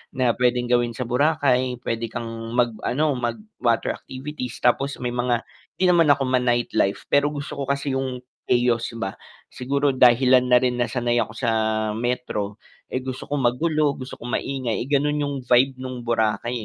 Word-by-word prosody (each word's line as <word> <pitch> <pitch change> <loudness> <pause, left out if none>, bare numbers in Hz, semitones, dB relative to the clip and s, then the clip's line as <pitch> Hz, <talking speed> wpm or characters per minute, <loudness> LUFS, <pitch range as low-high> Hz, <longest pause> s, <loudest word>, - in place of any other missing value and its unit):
na 130 -2 +3
puwedeng 125 0 0
gawin 120 -1 +2
sa 125 - -3
Boracay. 130 -1 +1
Puwede 115 0 -2
kang 115 0 -6
mag 120 -1 +3 0.2
ano, 145 0 +1
mag-water 120 - -1
activities 130 -2 -7
tapos 135 +3 +2
may 125 -1 -3
mga 120 -1 0 0.3
'di 185 -1 +3
naman 170 -2 +4
ako 140 -1 +4
ma-nightlife, 120 -5 +1
pero 145 0 +4
gusto 145 -1 -5
ko - - -1
kasi 140 +1 -1
yung 130 -1 -4 0.2
chaos 120 -1 +1
ba. 95 -4 -3 0.3
Siguro 140 +2 -1
dahilan 125 0 +5
na 125 - +7
rin 125 -1 0
na 120 - +1
sanay 120 -2 0
ako 115 -2 0
sa 115 +1 -2 0.5
Metro, 110 -3 -3 0.3
eh, 130 - -1
gusto 130 0 -6
ko 145 0 -2
magulo, 145 +4 +1
gusto 130 0 -8
ko 120 - -8
maingay, 125 -2 -2
eh, - - -9
ganun 145 +1 +2
yung 145 -1 -2
vibe 130 +2 +3
nung 130 -1 -6
Boracay, 115 0 0
125 Hz, 170 wpm, -23 LUFS, 120-140 Hz, 0.5 s, na